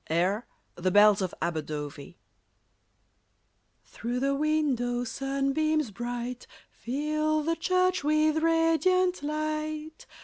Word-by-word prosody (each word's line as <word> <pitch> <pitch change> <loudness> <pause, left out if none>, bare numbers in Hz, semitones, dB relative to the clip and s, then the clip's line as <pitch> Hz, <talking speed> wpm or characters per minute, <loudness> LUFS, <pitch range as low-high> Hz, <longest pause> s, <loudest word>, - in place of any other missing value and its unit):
Air: 185 +8 0 0.3
"The 180 +1 -1
Bells 205 +1 +6
of 185 -2 -1
Aberdovey") 150 -1 -5 1.7
Through 240 +2 -4
the 275 +1 +1
window, 275 -5 0
sunbeams 275 +2 -1
bright 240 +3 -5 0.2
Fill 305 +4 -1
the 330 +2 0
church 365 0 +1
with 310 +1 +2
radiant 330 +3 +2
light. 310 +1 -4
285 Hz, 95 wpm, -28 LUFS, 235-310 Hz, 1.7 s, Bells